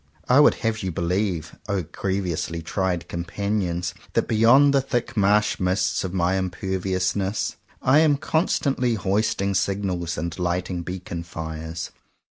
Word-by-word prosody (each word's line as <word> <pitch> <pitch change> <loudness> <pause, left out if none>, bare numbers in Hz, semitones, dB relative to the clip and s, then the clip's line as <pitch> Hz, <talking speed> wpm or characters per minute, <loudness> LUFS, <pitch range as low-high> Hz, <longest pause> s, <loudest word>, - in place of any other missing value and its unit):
I 125 +3 +6
would 150 - +6
have 110 -1 0
you 95 -2 -2
believe, 85 -1 -1
O 100 -3 0
grievously 85 -1 -3
tried 90 0 -1
companions, 90 0 -2 0.2
that 115 - +1
beyond 120 +6 +5
the 140 - +4
thick 120 -2 -2
marshmists 95 -3 +2
of 95 - -3
my 90 0 +1
imperviousness 95 +1 -1 0.3
I 130 +4 +5
am 155 -3 +4
constantly 140 -6 +1
hoisting 100 0 0
signals 95 -3 -1
and 85 +3 -4
light 90 +1 -1
ing 90 -1 -2
beacon 90 -1 -5
fires. 80 -1 -6
95 Hz, 130 wpm, -24 LUFS, 85-105 Hz, 0.3 s, I